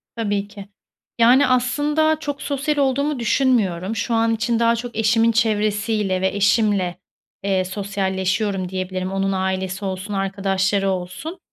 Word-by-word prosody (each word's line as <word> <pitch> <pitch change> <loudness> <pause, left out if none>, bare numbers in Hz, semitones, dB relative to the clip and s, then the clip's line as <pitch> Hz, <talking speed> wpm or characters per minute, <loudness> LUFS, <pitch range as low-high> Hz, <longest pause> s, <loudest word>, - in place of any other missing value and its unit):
Tabii 205 -3 -1
ki. 205 -1 -10 0.5
Yani, 250 +5 +6
aslında, 295 +5 +1
çok 290 -2 -5
sosyal 290 +1 -1
olduğumu 280 +1 +1
düşünmüyorum. 225 -6 +1
Şu 225 +3 -2
an 225 0 +2
için 225 +1 0
daha 230 0 +3
çok 235 +1 -6
eşimin 225 +1 +3
çevresiyle 210 -3 0
ve 190 - +2
eşimle, 200 -3 +1 0.5
eee, 190 -2 +1
sosyalleşiyorum, 195 0 -2
diyebilirim. 185 0 -3
Onun 195 0 0
ailesi 190 0 -2
olsun, 190 +2 -4
arkadaşları 195 0 0
olsun. 185 - -5
205 Hz, 130 wpm, -21 LUFS, 190-235 Hz, 0.5 s, Yani